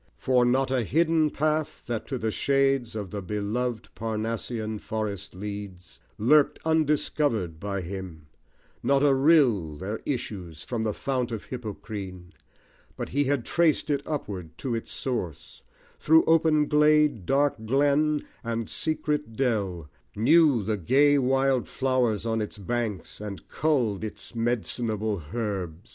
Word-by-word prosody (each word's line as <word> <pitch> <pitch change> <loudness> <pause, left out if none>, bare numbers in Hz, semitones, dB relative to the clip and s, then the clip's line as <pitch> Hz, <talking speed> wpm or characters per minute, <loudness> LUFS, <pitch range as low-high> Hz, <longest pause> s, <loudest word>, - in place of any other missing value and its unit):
For 125 -1 +3
not 130 +2 +2
a 130 -2 +2
hidden 160 +5 +2
path, 155 +1 -1
that 120 -2 -3
to 135 - -2
the 110 -2 -1
shades 135 -2 +1
Of 100 -4 -5
the 100 - -4
beloved 105 +4 -2
Parnassian 110 0 -3
forest 100 -4 -4
leads, 100 -3 -7 0.2
Lurked 140 +7 +4
undiscovered 145 - +1
by 100 +1 -3
him; 90 -4 -7 0.6
not 140 0 +3
a 145 -1 +5
rill 135 - +4
There 100 +8 -4
issues 95 - -4
from 120 -3 -3
the 110 -2 -1
fount 130 -3 -1
of 110 -3 -4
Hippocrene, 100 -6 -7 0.6
But - - -4
he 145 +2 +1
had 135 -3 0
traced 160 -3 +2
it 140 -1 +1
upward 95 - -5
to 130 - -3
its 115 - -4
source, 105 - -4 0.4
Through 160 +1 +5
open 160 -2 +4
glade, 150 - +3
dark 140 -4 +2
glen, 145 +4 +2 0.2
and 115 -1 -2
secret 150 -5 -2
dell, 100 - -1 0.3
Knew 140 0 +5
the 105 +2 -1
gay 140 - +4
wild 135 0 +2
flowers 125 -5 0
on 115 -1 0
its 105 - -5
banks, 105 -1 -3
and 105 -2 -7
culled 125 -10 0
Its 110 - -7
med'cinable 110 -6 -2
herbs. 100 -5 -4
115 Hz, 135 wpm, -26 LUFS, 105-140 Hz, 0.6 s, a